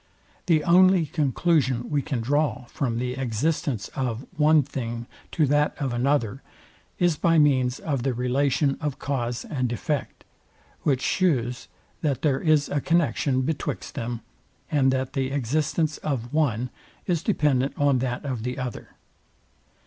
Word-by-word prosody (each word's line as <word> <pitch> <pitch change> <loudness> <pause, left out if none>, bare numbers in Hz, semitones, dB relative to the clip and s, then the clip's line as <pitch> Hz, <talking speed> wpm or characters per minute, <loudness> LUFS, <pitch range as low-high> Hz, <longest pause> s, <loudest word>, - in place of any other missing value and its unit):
The 160 -3 +3
only 185 0 +5
conclusion 140 -4 +1
we 145 -1 +2
can 130 -4 -3
draw 145 +1 0
from 120 -1 -2
the 125 +1 -2
existence 130 -1 -1
of 125 -1 -3
one 155 -1 +5
thing 120 -3 -5 0.3
to 160 - +3
that 145 +2 +1
of 135 -4 -1
another, 130 -1 0 0.6
is 175 -4 +2
by 165 -1 +3
means 130 -4 +3
of 140 -6 -2
the 130 0 -1
relation 135 +3 +1
of 150 -3 -2
cause 120 -4 -3
and 130 -5 -2
effect, 140 +4 -3 0.6
which 135 -3 +1
shews, 125 -10 0 0.3
that 145 -5 -1
there 140 -3 +2
is 155 -3 +3
a 145 - -1
connexion 145 -5 +1
betwixt 150 +2 -3
them, 120 0 -4 0.5
and 135 -3 +3
that 130 0 -2
the 135 -2 -1
existence 150 +4 0
of 130 -4 -3
one 125 -6 +1 0.3
is 175 -4 0
dependent 145 - +1
on 140 -3 +3
that 125 +1 -3
of 130 -5 -3
the 125 +2 -3
other. 125 -2 -6
135 Hz, 145 wpm, -25 LUFS, 125-150 Hz, 0.6 s, only